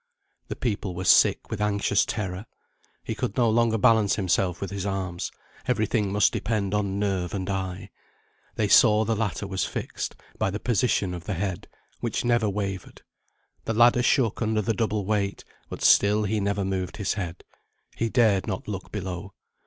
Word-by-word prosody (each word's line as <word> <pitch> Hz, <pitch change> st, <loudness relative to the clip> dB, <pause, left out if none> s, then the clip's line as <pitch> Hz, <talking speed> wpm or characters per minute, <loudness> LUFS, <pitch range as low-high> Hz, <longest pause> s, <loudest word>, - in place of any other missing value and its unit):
The -, -, -5 dB
people 100 Hz, -6 st, -3 dB
were 90 Hz, -, -4 dB
sick -, -, +4 dB
with 110 Hz, -2 st, -3 dB
anxious 105 Hz, -1 st, +1 dB
terror. 95 Hz, -1 st, -4 dB, 0.6 s
He -, -, -3 dB
could 100 Hz, -, -4 dB
no 120 Hz, -2 st, +4 dB
longer 115 Hz, 0 st, +2 dB
balance 110 Hz, -3 st, +4 dB
himself 90 Hz, -2 st, 0 dB
with 100 Hz, -, -5 dB
his 100 Hz, -2 st, -4 dB
arms; 95 Hz, -3 st, -3 dB, 0.4 s
every 115 Hz, -4 st, +2 dB
thing 105 Hz, -3 st, 0 dB
must 105 Hz, +1 st, +3 dB
depend 105 Hz, -3 st, -1 dB
on 100 Hz, -2 st, 0 dB
nerve 95 Hz, -3 st, -1 dB
and 95 Hz, -1 st, -3 dB
eye. 95 Hz, 0 st, -4 dB, 0.6 s
They 105 Hz, -, +1 dB
saw 110 Hz, +1 st, +6 dB
the 115 Hz, -, 0 dB
latter 105 Hz, -1 st, -2 dB
was 95 Hz, -2 st, -2 dB
fixed, -, -, -4 dB, 0.2 s
by -, -, +1 dB
the 105 Hz, +3 st, -4 dB
position 110 Hz, -6 st, +1 dB
of 90 Hz, -1 st, -7 dB
the 100 Hz, -, -2 dB
head, 95 Hz, 0 st, -3 dB, 0.3 s
which 120 Hz, 0 st, -2 dB
never 120 Hz, -3 st, +2 dB
wavered; 95 Hz, -2 st, -5 dB, 0.6 s
the 115 Hz, -, -1 dB
ladder 120 Hz, +2 st, +5 dB
shook 120 Hz, -4 st, +2 dB
under 110 Hz, -1 st, +1 dB
the 115 Hz, -, 0 dB
double 105 Hz, -2 st, -1 dB
weight; 100 Hz, -1 st, -1 dB, 0.3 s
but -, -, -6 dB
still 105 Hz, +1 st, +5 dB
he 105 Hz, +1 st, 0 dB
never 100 Hz, 0 st, -1 dB
moved 95 Hz, -2 st, -3 dB
his 100 Hz, -2 st, -1 dB
head 90 Hz, -4 st, -5 dB, 0.5 s
he 115 Hz, -, -1 dB
dared 110 Hz, -5 st, +3 dB
not 95 Hz, -4 st, -4 dB
look 100 Hz, -3 st, -6 dB
below. 95 Hz, -1 st, -5 dB
100 Hz, 175 wpm, -25 LUFS, 95-110 Hz, 0.6 s, saw